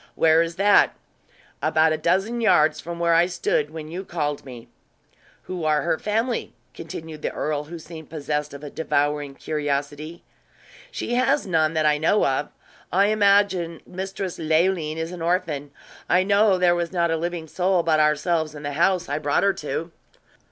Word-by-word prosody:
"Where 160 0 +4
is 165 0 -2
that?" 200 +2 +4 0.7
"About 160 0 +3
a - - -1
dozen 195 +9 0
yards 155 -8 +3
from 170 0 -6
where 170 0 +2
I 170 +1 +4
stood 175 -4 -1
when 155 -1 -8
you 175 +4 -6
called 150 -6 -3
me." 125 -4 -11 0.8
"Who 180 -3 -5
are 155 -1 +2
her 170 -2 0
family?" 225 +3 -2 0.2
continued 160 -2 -8
the - - -2
earl, 150 -1 -2
who 170 +3 -8
seemed 160 -1 -11
possessed 150 -1 -3
of 140 - -10
a 145 - -7
devouring 145 -2 -1
curiosity. 145 +2 -3 0.7
"She 365 - -4
has 255 +1 +2
none 160 -3 +1
that 155 -1 +1
I 150 -1 +3
know 165 +7 +3
of. 135 +2 0 0.4
I 200 +3 +3
imagine 200 -5 +2
Mistress 190 0 -5
Leoline 160 0 +1
is 165 +1 -3
an 180 -2 -8
orphan. 165 -5 -1 0.4
I 180 +1 +4
know 200 0 +3
there 180 -1 +4
was 170 -1 -2
not 170 -2 +1
a - - +2
living 170 0 -3
soul 180 +2 +1
but 160 -2 +2
ourselves 155 +1 +1
in 145 - -9
the 145 0 -3
house 180 +3 +2
I 145 +2 -2
brought 145 -1 +1
her 200 0 +3
to." 160 0 -4
165 Hz, 175 wpm, -23 LUFS, 150-180 Hz, 0.8 s, Where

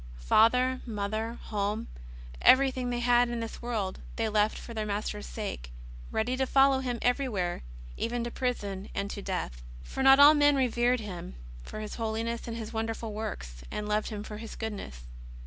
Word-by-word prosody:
Father, 250 - +4
mother, 220 +2 -3
home, 210 +1 -2 0.6
everything 260 -1 +5
they 240 0 -1
had 245 0 +4
in 240 -1 -2
this 230 -1 -6
world, 215 -6 -2 0.2
they 225 - 0
left 210 0 +2
for 235 - -8
their 220 -1 -2
Master's 200 - -3
sake, - - -5 0.4
ready 235 +4 0
to 265 0 0
follow 270 0 +5
Him 250 -2 -2
everywhere, 245 -9 0 0.4
even 235 +1 -1
to 235 - -4
prison 205 -7 -3
and 200 0 -2
to 200 - -5
death. 120 - -3 0.2
For 265 - -5
not 270 +1 +8
all 290 +2 +10
men 290 -1 +5
revered 245 -2 +2
Him 180 - -7 0.3
for 215 - -7
His 215 - -6
holiness 230 +1 -2
and 230 -1 -5
wonderful 225 0 -3
works, 65 - -5
and 210 - -4
loved 210 0 0
Him 210 -2 -5
for 210 -1 -7
His 225 0 -8
goodness. 205 - -6
225 Hz, 170 wpm, -29 LUFS, 205-245 Hz, 0.6 s, all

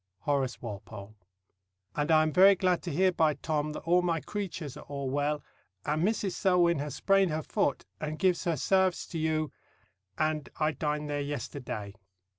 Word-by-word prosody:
HORACE 135 -4 -1
WALPOLE. 105 -1 -8 0.8
and 150 +2 0
I 155 -1 +6
am 155 -1 -1
very 195 +2 +7
glad 185 -1 +1
to 175 - -4
hear 185 +5 +3
by 160 -4 +2
Tom 150 +1 -2
that - - -6
all 175 +2 +3
my 170 -2 0
cruatuars 175 -8 -5
are - - -10
all 140 -2 -3
wall. 145 +1 0 0.4
and 150 +2 0
Mrs. 205 -1 +1
Selwyn 175 -3 +3
has 145 -1 -4
sprand 195 -2 +3
her 155 0 -2
Fot 140 - 0
and 155 0 -4
givs 185 -1 +2
her 170 -2 +1
Sarves 190 +4 +2
to 165 - -3
you 155 -2 0 0.7
and 155 -1 0
I 155 0 +2
dind 150 +1 -2
ther 145 0 -2
yester 145 -1 -4
Day. 105 -6 -5
155 Hz, 180 wpm, -29 LUFS, 145-180 Hz, 0.8 s, very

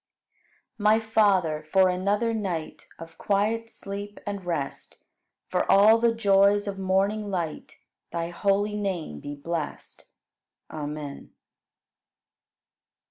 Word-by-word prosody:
14. - - -6
My 215 +1 +5
Father, 200 -8 +2
for 185 +5 +3
another 200 +5 0
night 185 -8 -4
Of 165 0 -12
quiet 215 +3 0
sleep 200 0 -7
and 200 -2 -4
rest. 165 -6 -5 0.4
For - - 0
all 215 +3 +7
the 235 0 +3
joys 205 -2 +3
of 195 -1 -4
morning 195 +3 0
light, 170 -5 -4 0.4
Thy 170 0 -3
holy 200 +3 +1
name 180 - -3
be 145 - -7
blest. 160 +1 -5 0.7
Amen. 150 -2 -6
195 Hz, 110 wpm, -26 LUFS, 165-210 Hz, 0.7 s, all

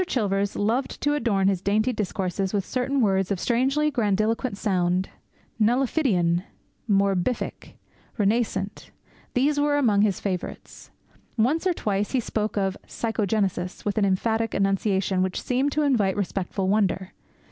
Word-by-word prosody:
Chilvers 200 -4 0
loved 230 +6 -1
to 290 - +2
adorn 220 -9 +1
his 195 -3 +1
dainty 215 +5 +1
discourses 195 -1 -2
with 195 -2 0
certain 265 +2 0
words 195 -3 +2
of 195 -3 -1
strangely 270 +7 +1
grandiloquent 220 -1 0
sound. 185 -2 0 0.5
'"Nullifidian," 220 - +2 0.5
"morbific," 195 +3 0 0.4
"renascent" 205 -2 -1 0.5
these 290 +4 +2
were 290 0 +2
among 215 -8 +3
his 205 -3 +2
favourites. 185 -3 -5 0.5
Once 290 +11 +2
or 365 - +2
twice 205 -7 -2
he 260 - +3
spoke 215 -2 -2
of 195 -1 0
"psychogenesis" 200 -5 -2
with 205 +1 0
an 205 - +3
emphatic 220 +4 0
enunciation 195 -1 +1
which 185 0 -1
seemed 260 +3 0
to 305 - +1
invite 210 -9 +2
respectful 195 -1 -2
wonder. 190 -2 +1
205 Hz, 135 wpm, -25 LUFS, 195-245 Hz, 0.5 s, among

